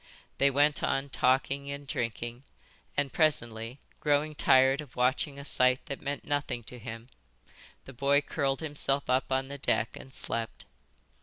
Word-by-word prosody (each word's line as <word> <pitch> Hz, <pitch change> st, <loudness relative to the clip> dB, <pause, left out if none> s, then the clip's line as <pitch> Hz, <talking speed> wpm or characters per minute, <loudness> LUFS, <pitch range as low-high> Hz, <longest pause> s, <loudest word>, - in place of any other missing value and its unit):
They 140 Hz, -, +5 dB
went 145 Hz, +1 st, +3 dB
on 135 Hz, +1 st, 0 dB
talking 135 Hz, +2 st, +1 dB
and 140 Hz, 0 st, -6 dB
drinking, 120 Hz, -1 st, -3 dB, 0.6 s
and 145 Hz, -2 st, 0 dB
presently, 115 Hz, -6 st, 0 dB, 0.2 s
growing 150 Hz, +1 st, +1 dB
tired 135 Hz, 0 st, +4 dB
of 145 Hz, -5 st, -13 dB
watching 130 Hz, +4 st, +1 dB
a 140 Hz, -, -8 dB
sight 125 Hz, -2 st, +2 dB
that 140 Hz, -, -6 dB
meant 140 Hz, 0 st, -4 dB
nothing 145 Hz, -4 st, -2 dB
to 125 Hz, +3 st, -9 dB
him, 115 Hz, 0 st, -8 dB, 0.8 s
the 135 Hz, -, -10 dB
boy 140 Hz, +3 st, +3 dB
curled 140 Hz, -2 st, -1 dB
himself 140 Hz, -3 st, +1 dB
up 130 Hz, +1 st, +1 dB
on 130 Hz, 0 st, +1 dB
the 140 Hz, +1 st, -7 dB
deck 115 Hz, -3 st, +1 dB
and 135 Hz, -, -11 dB
slept. 115 Hz, -2 st, -3 dB
135 Hz, 155 wpm, -30 LUFS, 125-145 Hz, 0.8 s, They